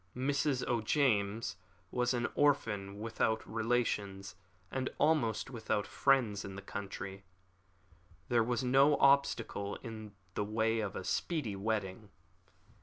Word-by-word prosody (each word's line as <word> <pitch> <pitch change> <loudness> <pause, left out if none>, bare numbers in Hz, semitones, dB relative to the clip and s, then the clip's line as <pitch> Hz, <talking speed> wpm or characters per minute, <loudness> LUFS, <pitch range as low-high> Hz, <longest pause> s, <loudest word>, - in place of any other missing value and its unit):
Mrs. 140 0 0
O'James 110 -4 +1 0.3
was 125 0 +1
an 120 -1 0
orphan, 105 -9 +1
without 110 0 -1
relations 110 -4 -1 0.4
and 130 -1 -1
almost 140 -7 +2
without 110 -4 -1
friends 120 -7 +2
in 95 -1 -7
the 95 - -7
country. 100 -1 -6 1.0
There 120 -2 +3
was 120 +2 -1
no 135 +3 +5
obstacle 120 -7 +2
in 110 -2 -8 0.2
the 105 - -1
way 110 +2 +1
of 105 -3 -3
a - - -4
speedy 140 - -1
wedding. 105 0 -2
110 Hz, 115 wpm, -33 LUFS, 100-130 Hz, 1.0 s, no